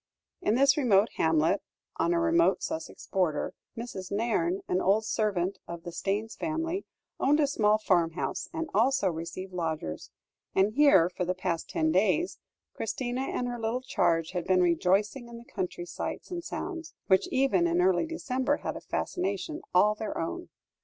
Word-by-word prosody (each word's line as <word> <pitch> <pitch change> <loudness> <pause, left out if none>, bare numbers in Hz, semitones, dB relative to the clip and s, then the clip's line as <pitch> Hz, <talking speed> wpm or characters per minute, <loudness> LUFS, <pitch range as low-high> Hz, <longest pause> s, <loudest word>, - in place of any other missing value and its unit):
In 210 - +2
this 275 +3 +5
remote 220 -6 +4
hamlet 160 +4 +2 0.4
on 340 - +1
a 345 - +2
remote 335 +1 +3
Sussex 320 0 -5
border, 180 -6 0 0.2
Mrs. 200 -6 -6
Nairne, 240 - 0
an 185 - +1
old 210 +3 +3
servant 200 -4 0
of 170 -1 -7
the 175 - -6
Staynes 205 +5 -2
family, 330 +4 -2 0.3
owned 290 +3 +3
a 300 - +5
small 215 -6 +3
farmhouse, 175 -5 0
and 325 0 -3
also 230 0 +3
received 170 +3 -6
lodgers; 160 - -3 0.5
and 195 +3 +3
here, 260 - +6
for 180 0 -4
the 180 +1 -1
past 180 -3 -2
ten 160 0 +1
days, 205 - +2 0.3
Christina 245 +3 -3
and 250 -2 -2
her 240 -1 -4
little 225 +3 -1
charge 165 -10 +1
had 180 -2 -3
been 185 -1 +4
rejoicing 195 - +1
in 235 0 -9
the 235 - -12
country 185 -8 -4
sights 175 - -5
and 345 -1 -4
sounds, 335 -2 -5
which 190 -2 +3
even 230 -10 +2
in 170 +1 +1
early 180 - +3
December 285 -3 -1
had - - -4
a - - -7
fascination 200 - -3
all 210 0 +5
their 215 0 -5
own. 345 - -4
210 Hz, 165 wpm, -29 LUFS, 180-270 Hz, 0.5 s, here